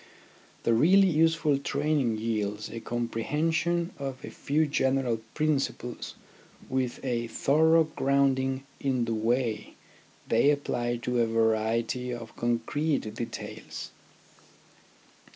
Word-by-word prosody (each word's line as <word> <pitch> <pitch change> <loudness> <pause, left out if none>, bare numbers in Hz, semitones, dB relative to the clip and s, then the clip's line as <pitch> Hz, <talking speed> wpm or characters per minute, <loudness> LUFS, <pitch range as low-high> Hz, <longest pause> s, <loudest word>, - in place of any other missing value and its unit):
The 115 - +3
really 190 +11 +5
useful 160 -3 +2
training 140 -4 0
yields 105 -2 -2
a 115 - -5
comprehension 150 +10 -1
of 135 -2 -5
a - - -8
few 155 +3 0
general 130 -5 +1
principles 140 -5 -1 0.5
with 130 -2 -1
a 120 -2 -1
thorough 160 +7 +4
grounding 135 -3 +1 0.2
in 130 -3 0
the 115 - -1
way 115 0 -1 0.5
they 115 +5 +4
apply 120 -4 0
to 125 -1 +1
a 115 - +2
variety 115 +2 0
of 115 -2 -7
concrete 120 +2 -1
details. 120 - -7
130 Hz, 105 wpm, -28 LUFS, 115-150 Hz, 0.5 s, really